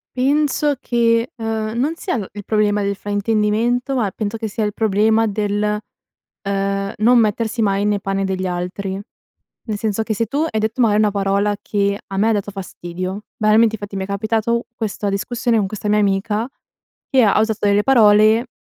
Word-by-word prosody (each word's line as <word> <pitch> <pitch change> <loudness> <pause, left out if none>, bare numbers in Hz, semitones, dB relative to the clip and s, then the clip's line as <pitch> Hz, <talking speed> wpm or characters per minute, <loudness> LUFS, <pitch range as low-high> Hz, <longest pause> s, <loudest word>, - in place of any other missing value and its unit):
Penso 290 +2 +1
che, 230 0 +1
ehm, 225 0 -3
non 300 +6 0
sia 360 +2 -3 0.2
il 205 -1 -7
problema 210 -1 +1
del 200 0 -1
fraintendimento 220 +5 0
ma 215 -7 0
penso 215 0 -4
che 220 -1 -4
sia 215 +1 -2
il 210 - -2
problema 220 +1 +2
del, 210 0 -1 0.7
uhm, 195 0 -1
non 240 +3 +4
mettersi 225 +1 0
mai 200 -1 +1
nei 205 -1 +1
panni 195 0 -2
degli 190 -1 -2
altri. 185 +2 -4 0.7
Nel 215 -3 -2
senso 215 0 -1
che 220 0 -2
se 230 +2 0
tu 275 +6 -4
hai 220 - -1
detto, 220 +3 -1
mari, 215 -3 +4
una 210 -1 +3
parola 200 +1 0
che 200 -1 -1
a 195 - -6
me 210 +3 +2
ha - - +3
dato 205 -1 -2
fastidio 185 0 -6
banalmente 220 +1 +4
infatti 205 -1 -6
mi 190 - -2
è - - -6
capitato 220 +3 -1
questa 210 -2 -3
discussione 230 +3 0
con 205 - +1
questa 210 +1 -5
mia 210 - +3
amica 210 +3 0 0.6
che 265 -2 +4
ha 210 -3 +4
ha - - +3
usato 220 -1 0
delle 205 0 +3
parole 220 -1 +5
210 Hz, 185 wpm, -19 LUFS, 200-225 Hz, 0.7 s, parole